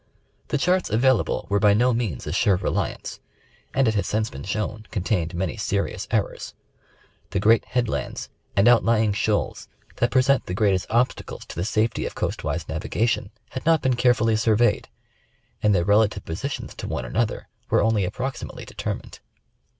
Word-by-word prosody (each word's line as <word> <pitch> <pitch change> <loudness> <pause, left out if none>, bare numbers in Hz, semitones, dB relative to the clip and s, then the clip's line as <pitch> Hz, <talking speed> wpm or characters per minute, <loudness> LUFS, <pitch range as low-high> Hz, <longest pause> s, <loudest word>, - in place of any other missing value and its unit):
The - - 0
charts 180 +5 +1
available 125 +1 +2
were 100 0 +1
by 100 0 +5
no 125 +3 +3
means 115 - -2
a - - -3
sure 100 - +3
reliance, 90 - -3 0.5
and 135 -2 +2
it 110 - +2
has 105 - 0
since 110 +1 -1
been 65 - -8
shown, 105 +5 -3
con 100 -5 -2
tained 85 -5 -1
many 90 -1 -2
sei'ious - - -2
errors. - - -2 0.7
The 100 - -1
great 110 +3 +4
headlands 125 -3 -2 0.3
and 100 +4 +4
outlying 115 -3 +4
shoals 105 +1 -1 0.3
that 120 - +2
present 135 +1 +3
the 90 - -3
greatest 100 -3 +2
obstacles 120 +2 -1
to - - -10
the 85 - -2
safety 110 +1 0
of - - -8
coast - - -3
wise 80 +2 -2
navigation, 105 +8 -1 0.2
had 130 - -5
not 160 -2 +3
been 130 -2 +2
carefully 120 -2 +3
surveyed, 110 +1 +2 0.7
and 105 -1 +3
their 85 -2 +2
rela 105 +1 +5
tive 100 - -9
positions 135 +13 -4
to - - -5
one - - -3
another 115 +2 -1 0.2
were - - +3
only 110 -2 +2
approximately 125 +8 -4
determined. - - -5
110 Hz, 170 wpm, -24 LUFS, 100-120 Hz, 0.7 s, by